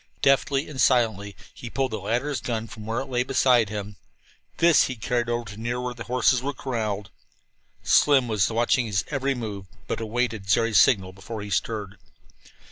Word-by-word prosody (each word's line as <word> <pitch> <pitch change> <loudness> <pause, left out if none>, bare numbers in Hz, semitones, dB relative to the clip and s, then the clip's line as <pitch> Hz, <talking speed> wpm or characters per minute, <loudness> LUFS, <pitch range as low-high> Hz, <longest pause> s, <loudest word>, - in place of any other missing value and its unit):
Deftly 140 +1 +2
and 135 -4 -4
silently 110 -7 +2 0.2
he 120 - -9
pulled 135 +1 -1
the 110 - -3
latter's 125 +6 -2
gun 115 -2 -3
from 110 -1 -10
where 115 +3 -1
it - - -5
lay 125 -2 -1
beside 125 -4 +3
him. 105 -1 -6 0.6
This 170 -2 +5
he 130 - -4
carried 120 +1 -1
over 120 0 -1
to 105 - -11
near 120 +2 -3
where 125 0 -3
the 120 -1 -9
horses 125 0 +2
were 140 +1 -3
corralled. 105 -7 -3 0.7
Slim 140 -3 +4
now 115 - -5
was 105 -3 +2
watching 120 +1 +1
his 95 -3 -1
every 140 -1 0
move, 105 -5 -6 0.2
but - - -3
awaited 110 -2 -2
Jerry's 110 +4 +4
signal 95 -6 +2
before 105 +3 -7
he 100 - -8
stirred. 105 -1 -2
120 Hz, 185 wpm, -25 LUFS, 105-130 Hz, 0.7 s, This